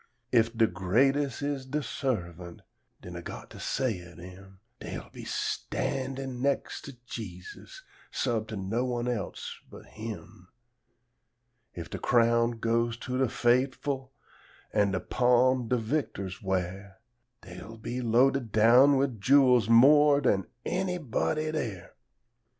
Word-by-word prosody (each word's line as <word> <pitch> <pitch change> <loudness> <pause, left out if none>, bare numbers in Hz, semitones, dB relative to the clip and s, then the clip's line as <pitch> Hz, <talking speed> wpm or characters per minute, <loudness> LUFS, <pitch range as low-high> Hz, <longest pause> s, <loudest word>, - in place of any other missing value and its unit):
If 115 -1 +2
de 115 - +5
greates' 130 +10 +1
is 140 -2 -3
de 150 +2 -2
servant, 90 - -4 0.4
den 90 -1 -8
Ah 85 - -6
got - - -9
to - - -11
say 120 -9 -1
o' 85 0 -14
dem, 95 +2 -13 0.2
Dey'll - - -7
be - - -10
standin' 130 -1 -3
nex' 140 +1 -1
to 140 -3 -10
Jesus, 95 -7 -9 0.3
sub 110 -2 -1
to 110 - -6
no 100 +6 -1
one 120 -1 -2
else 120 -4 -4
but - - -12
Him; 105 -5 -9 1.3
If 85 - -6
de - - -5
crown 115 0 +3
goes 115 +1 0
to 125 +2 -4
de 130 - +3
fait'ful, 130 +3 0 0.6
an' 105 -2 +3
de 95 -1 -1
palm 125 +1 +2
de 125 - +1
victors 110 -6 -3
wear, 95 +1 -3 0.5
Dey'll 95 +4 -10
be 120 +3 -4
loaded 125 +1 +2
down 125 +6 +6
wid 130 -6 -1
jewels 125 -3 +5
more 145 +5 +7
dan 100 -9 +1 0.2
anybody 165 -4 -1
dere. 115 - -4
120 Hz, 130 wpm, -28 LUFS, 100-135 Hz, 1.3 s, more